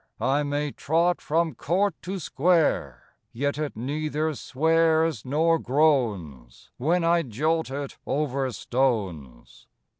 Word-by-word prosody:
I 135 +6 +1
may 145 0 -2
trot 170 +5 +1
from 165 +1 0
court 190 +5 0
to 190 +2 -4
square, 155 - 0 0.2
Yet 140 +4 -2
it 150 -5 -4
neither 150 +5 -2
swears 160 -1 +1
nor 160 +5 +2
groans, 110 - 0
When 165 +7 +1
I 170 +1 +3
jolt 155 +6 -1
it 140 0 -6
over 135 -2 -1
stones." 95 - -3
145 Hz, 115 wpm, -25 LUFS, 125-160 Hz, 0.2 s, I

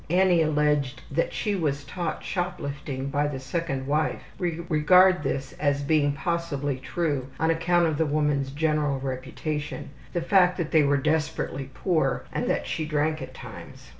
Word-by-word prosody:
Annie 180 -1 +4
alleged 150 -4 +1 0.3
she 210 - -2
was 145 -7 -1
taught 170 +5 -4
shop 180 0 -2
lifting 140 -1 -4
by 145 +1 +1
the 140 -2 -4
second 135 -1 -3
wife 150 +3 0 0.2
we 170 -2 -1
regard 180 +3 +5
this 135 -3 -3
as 145 -1 +1
being 145 -1 +2
possibly 145 -3 -2
true 145 -3 -2
on 160 +1 +3
account 170 +1 +2
of 160 -2 0
the 160 - +3
woman's 145 -2 +1
general 150 -1 0
reputation, 140 +3 -4 0.2
the 175 - 0
fact 180 +1 +4
that 170 -4 -2
they 160 - +6
were 145 0 +3
desperately 150 -2 -1
poor, 160 -7 0
and - - -1
that - - 0
she 160 - -2
drank 155 +1 0
at - - -8
times. - - -11
150 Hz, 165 wpm, -26 LUFS, 140-170 Hz, 0.3 s, they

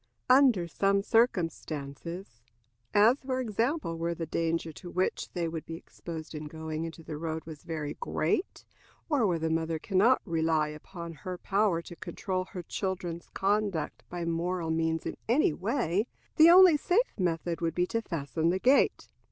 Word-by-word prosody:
Under 255 -10 +5
some 195 +3 +1
circumstances, 170 - -1 0.5
as, 225 +7 +5
for 260 -1 -2
example, 230 - -1
where 170 +1 -1
the 165 - -4
danger 165 +1 -1
to 175 - -10
which 185 +2 -1
they 170 -2 -1
would 160 -1 -4
be 165 - -7
exposed 165 -1 -8
in 155 0 -5
going 160 +1 -4
into 165 0 -8
the 155 -1 -6
road 160 0 -4
was 155 -2 -9
very 155 -3 -4
great, 175 - -1 0.4
or 275 -9 +3
where 175 -3 +1
the 160 0 -1
mother 160 0 0
can 190 +3 0
not 240 +6 +5
rely 160 -2 +1
upon 170 +2 -8
her 180 +4 -6
power 195 -3 +1
to 175 - -10
control 185 +2 -3
her 185 -2 -7
children's 175 -2 -4
conduct 200 -4 0
by 175 -1 -4
moral 170 0 -1
means 160 0 0
in - - -4
any 240 - +4
way, 205 - 0 0.3
the 315 +1 +8
only 360 -2 +8
safe 405 +11 +1
method 170 -1 -1
would 165 -1 -1
be 180 - +2
to 230 +5 -2
fasten 160 -3 -1
the 180 - +2
gate. 260 +8 +3
170 Hz, 170 wpm, -29 LUFS, 160-205 Hz, 0.5 s, the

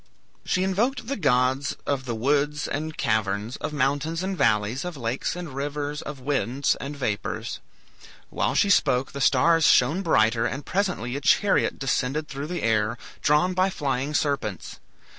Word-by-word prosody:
She 185 - 0
invoked 225 +8 0
the 275 +4 -2
gods 130 - +1
of 140 -3 -1
the 120 -3 -3
woods 145 +5 0
and 155 +2 -4
caverns, 110 +1 -1
of - - -4
mountains 150 +4 0
and 190 0 -2
valleys, 110 - +1
of 180 -3 -5
lakes 120 +5 -2
and 175 -5 -7
rivers, 145 +2 -3
of 150 -3 -7
winds 135 0 0
and 140 +1 -6
vapors. 110 -7 -3 0.7
While - - 0
she 200 - +3
spoke 125 -7 +2
the 140 - -6
stars 160 +6 +4
shone 145 +7 +4
brighter, 115 - +2
and 135 +3 -5
presently 180 - -1
a 140 - -3
chariot 200 +7 +3
descended 135 +3 -1
through 140 +2 -5
the 175 +1 -4
air, 110 0 +1 0.2
drawn 150 +5 +3
by 185 +1 +2
flying 140 -3 -2
serpents. 135 - -2
140 Hz, 160 wpm, -25 LUFS, 125-160 Hz, 0.7 s, stars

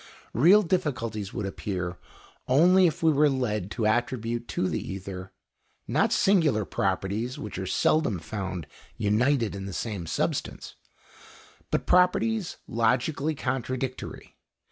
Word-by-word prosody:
Real 180 - +6
difficulties 120 - -2
would 105 -4 -4
appear 90 -3 -4 0.5
only 180 +8 +5
if 160 0 -3
we 160 - +5
were 150 0 +4
led 105 -8 -1
to 110 +1 -2
attribute 120 +1 0
to 95 - -1
the - - -2
ether, 95 -1 -7 0.6
not - - +2
singular 160 - +3
properties 105 +9 -1
which 105 -3 -6
are 95 - -4
seldom 150 - +2
found 95 -2 -5 0.3
united 115 +3 +2
in 100 0 -6
the 95 - -6
same 100 -7 -4
substance, - - -2 1.0
but - - -1
properties 195 +3 +2
logically 130 +7 +1
contradictory. 130 -1 -4
120 Hz, 120 wpm, -27 LUFS, 100-145 Hz, 1.0 s, Real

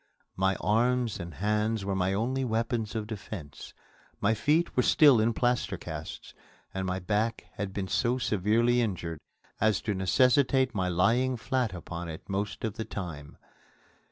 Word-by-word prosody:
My 95 +1 +2
arms 120 +3 +1
and 85 -3 -7
hands 105 +1 0
were 100 - -1
my 95 0 +1
only 125 +7 0
weapons 115 -1 -1
of 110 -1 -2
defence. 95 -8 -8 0.5
My 105 +2 +2
feet 150 +10 +1
were 125 - +4
still 140 -1 +6
in 115 +2 +3
plaster 120 +1 0
casts, - - -7 0.4
and 95 0 -2
my 90 0 -1
back 105 +5 -1
had 100 -1 -4
been 95 0 -3
so 125 +5 +1
severely 115 +2 +2
injured 85 -7 -3 0.4
as 110 -1 +3
to 105 - -1
necessitate 130 +7 +3
my 95 -3 0
lying 115 +9 +2
flat 125 -1 -1
upon 85 0 -6
it 80 - -8
most 100 +1 -3
of 110 -1 -3
the 110 - -2
time. 80 -7 -7
105 Hz, 155 wpm, -29 LUFS, 95-120 Hz, 0.5 s, still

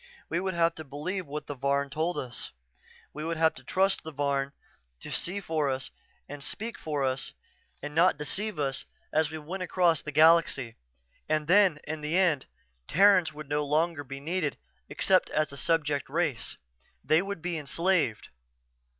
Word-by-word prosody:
We 165 - 0
would 190 -1 -2
have 165 0 +3
to 160 - -8
believe 155 +6 -4
what 150 +2 -5
the 145 - -5
Varn 140 +1 0
told 160 +4 -1
us 125 -2 -4 0.6
we 150 - -5
would 165 +1 -2
have 160 0 +4
to - - -13
trust 195 +1 +2
the 160 - -7
Varn 140 -1 0 0.5
to - - -8
see 190 +4 -1
for 160 -6 0
us 130 0 -3 0.4
and 145 0 -7
speak 220 - -3
for 150 -3 -2
us 130 0 -1 0.5
and 145 0 -5
not 170 +1 +4
deceive 195 +7 -2
us 135 -3 -2 0.3
as 155 -1 +3
we 160 - -5
went 170 +5 -6
across 175 -3 +2
the 150 - -6
galaxy. 155 -6 +4 0.5
And 155 -1 +1
then, 180 -2 +5
in 155 0 -5
the 155 +4 0
end, 170 -8 +2 0.4
Terrans 185 -1 +5
would 150 -1 -9
no 150 +1 0
longer 155 +1 +1
be 135 0 -7
needed 155 0 -2 0.3
except 185 -1 +3
as 155 -1 0
a - - -8
subject 145 0 0
race. 150 -6 -1 0.5
They 155 +2 +4
would 195 -4 -5
be 175 -2 -2
enslaved. 155 - 0
155 Hz, 175 wpm, -29 LUFS, 145-175 Hz, 0.6 s, then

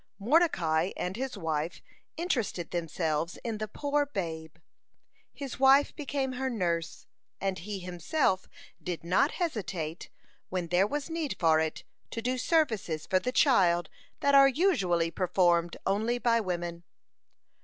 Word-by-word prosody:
Mordecai 195 - +2
and 180 +1 -3
his 260 +2 -4
wife 160 0 -2 0.4
interested 245 - -2
themselves 165 -1 -2
in 225 -3 -3
the 215 - -3
poor 290 +6 0
babe. 160 - -5 0.8
His 275 -3 -7
wife 270 +2 +5
became 275 -2 -2
her 260 +1 -2
nurse, 170 -8 -2 0.3
and 195 -1 -2
he 205 +3 -5
himself 185 - -1 0.3
did 175 -3 -4
not 185 - +2
hesitate, 185 - -3 0.4
when 180 -2 -3
there 180 +3 +3
was 295 +5 -4
need 325 -3 -2
for 160 -3 +4
it, 160 0 -2 0.3
to - - -5
do 250 +2 -1
services 220 - +1
for 185 - +2
the 250 - -2
child 175 - +3 0.3
that 280 - +3
are 275 0 +8
usually 195 - +2
performed 175 -2 +2
only 220 +5 +1
by 235 -1 +2
women. 175 -3 -3
195 Hz, 135 wpm, -29 LUFS, 170-265 Hz, 0.8 s, are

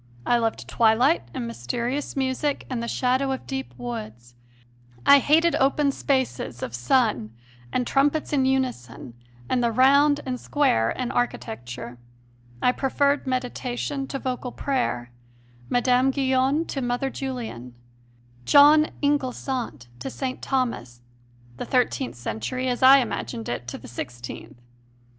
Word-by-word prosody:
I 240 - +3
loved 225 -1 -2
twilight 230 - +3
and 120 - -4
mysterious 235 - -3
music 270 +2 -1
and 245 -2 -2
the 235 - -4
shadow 260 +3 +1
of 265 - -4
deep 265 -1 -5
woods; 215 - -7 0.7
I 280 - +8
hated 325 +5 +3
open 280 +1 +2
spaces 260 - -2
of 120 - -5
sun 120 - +1 0.4
and 250 - 0
trumpets 290 +4 +1
in 270 -2 +3
unison 255 - -2 0.3
and 250 -1 +1
the 235 - +2
round 280 +4 +5
and 255 -1 -3
square 115 - +1
in 250 - -3
architecture. 120 - -4 0.6
I 250 - +5
preferred 280 +2 0
meditation 255 +2 -3
to 275 - -4
vocal 255 -1 -4
prayer, 180 - -2 0.6
Mme. 250 +1 +3
Guyon 265 +3 +1
to 275 - -4
Mother 245 +2 -1
Julian, 225 - -6 0.7
"John 295 - +7 0.2
Inglesant" 255 - -1
to - - -5
St. 260 -2 -4
Thomas, 235 - -2 0.6
the - - -4
thirteenth 255 +1 0
century 120 - -4
as 245 - -2
I 265 +1 +9
imagined 115 - -4
it 120 0 -4
to - - -5
the - - -12
sixteenth. 120 0 -8
255 Hz, 130 wpm, -24 LUFS, -, 0.7 s, I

